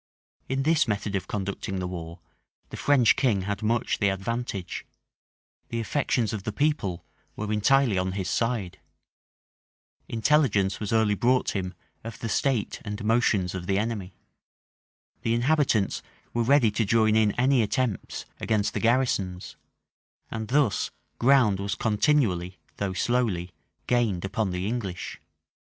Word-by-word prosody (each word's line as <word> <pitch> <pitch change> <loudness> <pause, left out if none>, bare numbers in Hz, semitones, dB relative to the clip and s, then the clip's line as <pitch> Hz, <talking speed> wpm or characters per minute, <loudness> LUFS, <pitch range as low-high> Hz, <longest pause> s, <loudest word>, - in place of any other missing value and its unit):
In 135 +1 0
this 160 0 +3
method 105 -1 -2
of 95 - -2
conducting 100 0 -3
the 90 - -2
war, 85 -1 -7 0.5
the - - -6
French 130 -6 +4
king 105 -8 +1
had 100 +1 -3
much 115 +2 0
the 100 - +3
advantage: 95 -1 -3 0.9
the 115 - -2
affections 115 -2 0
of 105 - -3
the 110 - -3
people 105 - -1 0.3
were 105 0 -3
entirely 115 -1 +3
on 95 0 -1
his 95 -2 -3
side: 115 -5 -1 1.3
intelligence 115 -5 +2
was 105 - -4
early 110 -2 +3
brought 125 +4 +2
him 90 -2 -3 0.3
of 115 0 -7
the 115 - -4
state 125 -1 0
and 105 0 -5
motions 110 -5 +2
of 90 -2 -5
the 95 - +1
enemy: 105 -3 -3 1.1
the 115 - +1
inhabitants 125 -5 +2 0.3
were 120 - +1
ready 120 -2 +4
to 110 - 0
join 110 +1 +3
in 110 -1 +4
any 130 0 +3
attempts 110 -1 -2
against 105 -2 0
the - - -1
garrisons: 115 -7 0 0.8
and 110 -1 -4
thus 135 -3 +2 0.3
ground 120 -6 +4
was 100 +1 -2
continually, 105 - +1 0.2
though 100 -2 -2
slowly, 95 -5 0 0.3
gained 110 -7 +1
upon 100 +1 -1
the 90 +1 -3
English. 100 -5 -4
110 Hz, 140 wpm, -26 LUFS, 95-120 Hz, 1.3 s, French